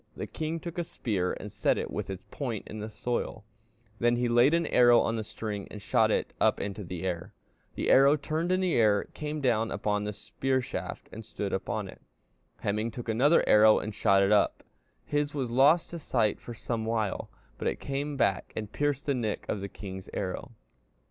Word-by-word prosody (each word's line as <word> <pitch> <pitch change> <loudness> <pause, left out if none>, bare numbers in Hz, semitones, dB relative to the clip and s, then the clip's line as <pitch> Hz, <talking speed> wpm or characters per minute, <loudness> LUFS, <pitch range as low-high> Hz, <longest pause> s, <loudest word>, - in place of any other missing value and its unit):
The - - -3
king 160 +1 -4
took 170 +1 -6
a - - +1
spear 105 - -2
and - - -7
set - - +1
it - - -3
with - - -4
its 95 -1 -6
point 120 -7 -4
in 110 - -7
the 105 +1 -5
soil, 110 0 -3 0.6
then 120 0 +3
he 120 0 +1
laid 120 +6 +5
an 170 0 +1
arrow 120 -3 +6
on 115 - +1
the 110 - -2
string 105 -2 -5
and 105 - -8
shot - - +2 0.3
up - - +3
into 100 +1 -4
the 90 0 -6
air. 90 -1 -4 0.4
The - - 0
arrow 140 +2 +7
turned 160 +4 -2
in 185 0 +2
the 185 -2 +1
air 105 -3 +4
and - - -14
came 150 0 -4
down 115 -4 +2
upon 105 -1 -1
the 105 0 -3
spear 105 +6 -1
shaft 125 - -5
and - - -8
stood - - -4
up - - -3
in - - -2
it. - - -12 0.6
Hemingr 105 +3 -1
took 120 +1 -7
another 135 +9 +4
arrow 110 0 +7
and 110 - -3
shot 100 -1 +4
up; 105 - +3 0.4
his 145 0 -1
was 130 -4 -2
lost 145 +7 +4
to 170 - -5
sight 115 -8 +1
for 120 - -8
some 115 0 -3
while, 110 -3 -1 0.3
but - - -2
it - - -1
came 140 +1 -3
back 95 -8 +1
and 105 -1 -5
pierced 145 -1 0
the 140 - +1
nick 115 -5 -2
of 100 - -2
the 100 - -5
king's 95 -1 -8
arrow.... 95 +5 -4
115 Hz, 210 wpm, -29 LUFS, 105-140 Hz, 0.6 s, arrow